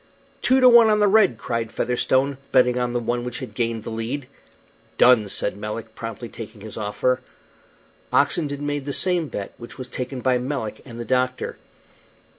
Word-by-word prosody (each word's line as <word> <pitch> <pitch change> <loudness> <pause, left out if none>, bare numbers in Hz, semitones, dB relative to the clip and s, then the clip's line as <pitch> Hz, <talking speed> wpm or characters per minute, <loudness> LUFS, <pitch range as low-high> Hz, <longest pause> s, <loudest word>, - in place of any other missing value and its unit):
"Two 260 +1 +4
to 255 - +7
one 235 -2 +8
on 210 0 +3
the 210 - +4
red!" 195 - +4
cried 115 -1 -3
Featherstone, 130 +2 0
betting 125 -1 +4
on 125 -1 -1
the 120 - 0
one 120 +1 -2
which 125 -1 -5
had 130 - -7
gained 115 -2 -2
the - - -6
lead. 120 +5 -4 0.7
"Done," 120 -5 +5
said - - 0
Melick, 105 +2 -6
promptly 115 +1 -6
taking 110 -2 -10
his 110 0 -8
offer. 115 +4 0 0.9
Oxenden 145 0 +1
made 145 -1 -2
the 140 - -2
same 175 -2 +2
bet, 100 -7 -6
which 120 - -10
was 130 -1 -6
taken 125 0 -5
by 130 -1 +2
Melick 125 -4 -4
and 120 -3 -10
the 120 - -4
doctor. 130 0 -1
125 Hz, 180 wpm, -23 LUFS, 115-140 Hz, 0.9 s, one